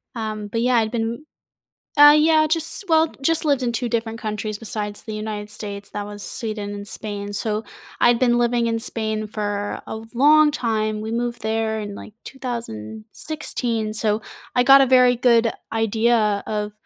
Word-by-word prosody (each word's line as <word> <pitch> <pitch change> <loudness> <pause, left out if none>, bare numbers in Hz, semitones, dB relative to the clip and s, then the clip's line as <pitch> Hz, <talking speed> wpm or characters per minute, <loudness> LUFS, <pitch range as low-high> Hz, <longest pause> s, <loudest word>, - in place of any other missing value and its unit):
Um, 215 -2 -4
but 230 +3 -2
yeah, 250 +1 +2
I've 220 -1 +1
been 235 +4 -3 0.7
uh, 290 0 +9
yeah, 310 0 +4
just 320 +4 0
well, 320 0 +3
just 325 +3 +4
lived 285 -3 +2
in 245 -2 0
two 245 +1 -2
different 225 -1 -3
countries 215 -1 -4
besides 210 -1 -3
the 220 - -7
United 215 -1 -5
States. 205 -1 -4
That 205 0 -4
was 205 -1 -6
Sweden 215 -4 -2
and 205 0 -7
Spain. 205 0 -4
So 220 - -2 0.6
I’d 240 0 +4
been 240 -1 +3
living 240 0 +1
in 230 0 -1
Spain 220 -1 -2 0.2
for 205 -1 -3
a - - -6 0.3
long 305 0 +7
time. 220 -6 -1
We 220 +1 -5
moved 240 0 -4
there 220 0 -1
in, 205 -1 -6
like, 205 - -11
2016, 230 - -4
so 215 0 0 0.3
I 245 - +4
got 275 +2 +8
a 270 - +3
very 250 -1 +5
good 235 -2 +3 0.2
idea 225 +1 +2 0.3
of 210 -1 -3
225 Hz, 170 wpm, -21 LUFS, 210-245 Hz, 0.7 s, uh